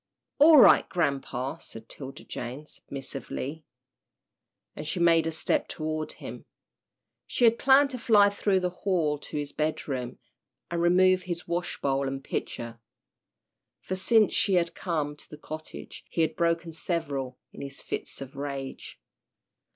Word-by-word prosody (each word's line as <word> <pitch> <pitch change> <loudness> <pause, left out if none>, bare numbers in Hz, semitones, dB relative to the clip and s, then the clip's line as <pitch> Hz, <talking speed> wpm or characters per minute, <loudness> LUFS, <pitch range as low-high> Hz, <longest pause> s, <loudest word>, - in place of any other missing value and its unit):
"All 305 +2 +9
right, 255 - +7
grampa," 140 -3 -1
said 115 0 -11
'Tilda 135 -1 -8
Jane, 125 +5 -6
submissively, 140 +2 -6 1.1
and 150 - -6
she 180 - -2
made 165 -1 +4
a - - 0
step 160 - 0
toward 155 0 -3
him. - - -9 0.8
She - - -1
had 230 0 +4
planned 275 +1 +5
to 250 - -5
fly 210 -4 +5
through 200 -2 +1
the 180 0 0
hall 160 -7 +1
to 150 - -6
his 145 -1 -3
bedroom, 135 -5 -2 0.5
and 170 0 0
remove 185 +2 +5
his 175 -2 -5
wash 175 +1 -2
bowl 135 0 +1
and 135 0 -4
pitcher, 115 -3 -4 1.0
for 185 - -4
since 215 +3 +4
she 195 - +3
had 170 -1 +2
come 150 -5 -2
to - - -13
the 150 - -10
cottage 155 +1 -8
he 165 - 0
had 160 -1 +1
broken 170 0 0
several 140 -7 -3 0.2
in - - -9
his 140 0 -7
fits - - -5
of 135 0 -8
rage. 140 -1 -6
160 Hz, 150 wpm, -28 LUFS, 140-180 Hz, 1.1 s, All